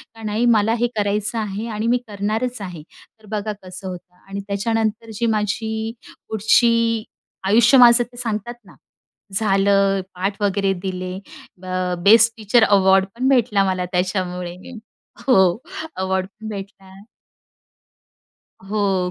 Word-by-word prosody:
का 225 - -12
नाही 215 +3 0
मला 215 +2 +2
हे 240 - +2
करायचं 210 +2 -1
आहे 210 +1 -4
आणि 215 +2 -2
मी 245 +1 +3
करणारच 215 +3 -3
आहे. 175 -5 -7 0.4
तर 215 - -19
बघा 215 0 -2
कसं 185 +1 -9
होतं 180 0 -9
आणि 195 +1 -5
त्याच्यानंतर 220 +2 -1
जी 230 +3 -2
माझी, 220 +1 -2 0.4
पुढची, 230 +1 +2 0.4
आयुष्य 235 +5 +5
माझं 240 -1 +7
ते 245 0 -16
सांगतात 235 0 -4
ना. 180 - -17 0.6
झालं 195 -1 +2
पाठ 195 +3 -3
वगैरे 195 -1 +1
दिले. 185 0 -4 0.4
ब - - -12 0.4
बेस्ट 225 +2 +6
टीचर 220 +2 +3
अवॉर्ड 190 -2 +4
पण 255 +2 -1
भेटला 230 -6 +3
मला 185 -1 -1
त्याच्यामुळे. 180 -1 -2 0.7
हो 190 -7 +4 0.4
अवॉर्ड 190 0 -1
पण 215 +2 -12
भेटला. 195 -1 -9 1.8
हो. 195 -4 0
205 Hz, 130 wpm, -21 LUFS, 190-225 Hz, 1.8 s, माझं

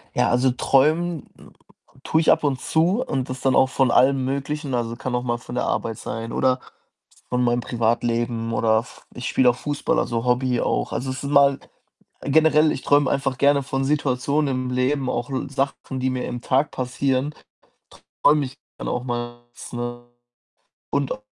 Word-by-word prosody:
Ja, - - +3
also, 125 +1 +3
träumen 155 +5 +1 0.8
tue 160 - +2
ich - - +4
ab - - +2
und 135 -3 0
zu 180 +10 +1
und 130 - -2
das 130 - -5
dann 135 -1 +2
auch 130 - +4
von 130 -2 +2
allem 130 0 +4
Möglichen, 140 +1 -3
also, 120 -1 -1
kann 125 +1 -5
auch 125 0 0
mal 120 -1 -1
von 120 +1 -9
der - - 0
Arbeit 115 -2 -2
sein 115 +1 -5
oder 130 -1 +1 0.7
von 125 0 0
meinem 120 0 +2
Privatleben 115 0 -1
oder 110 -1 +3
F 120 +2 -9
ich 125 - -6
spiele 125 -1 +4
auch 120 - -2
Fußball, 145 +1 -1
also, 115 0 -1
Hobby 125 0 +1
auch. - - -1
Also, 130 +1 -2
es 130 +2 -5
ist 140 - -3
mal 140 -1 +5 0.6
generell, 155 +1 +4
ich - - -6
träume 145 -2 +3
einfach 135 -2 -1
gerne 140 0 +4
von 135 +1 -2
Situationen 140 0 0
im 130 0 -2
Leben. 130 +1 0
Auch 120 +3 -3 0.2
Sachen, 135 -1 -3
die 130 0 0
mir 125 -1 -3
im 120 - -5
Tag 135 +3 +1
passieren, 130 +2 -1 0.9
träume 145 -1 +4
ich 135 +3 -12 0.2
dann - - -5
auch 125 0 -2
mals, 120 0 -6
ne? 120 0 -5 0.9
Und 140 -1 0
auch 105 - -8
130 Hz, 180 wpm, -23 LUFS, 120-140 Hz, 0.9 s, mal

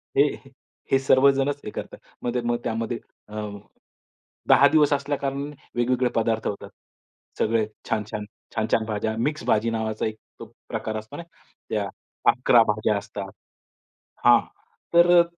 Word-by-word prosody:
हे - - +7 0.7
हे 135 - +6
सर्वजणच 135 +1 +3
हे 105 - -5
करतात. - - -7 0.3
मग 120 - -1
ते 125 - 0
मग 120 0 0
त्यामध्ये 115 +1 -2 0.3
अं, 105 -1 -5 0.9
10 140 - +7
दिवस 150 -1 +4
असल्या 140 0 -1
कारणाने 140 +2 -3 0.2
वेगवेगळे 125 +1 +2
पदार्थ 115 0 +1
होतात. 100 - -5 0.7
सगळे 110 0 +2 0.2
छान-छान, 105 -2 -2 0.3
छान-छान 110 0 +1
भाज्या, 110 0 -1
मिक्स 150 +5 -1
भाजी 110 +2 +2
नावाचा 110 -1 -2
एक 110 0 -3 0.2
अ, - - -4 0.3
प्रकार 110 - -3
असतो 110 0 -8
ना, 170 - -6 0.5
त्या 105 -2 -1 0.4
11 120 -1 +5
भाज्या 105 0 +1
असतात. 100 -1 -6 0.9
हां, - - +8 0.5
तर 170 +1 +6
अ, - - +7
115 Hz, 140 wpm, -25 LUFS, 110-135 Hz, 0.9 s, हां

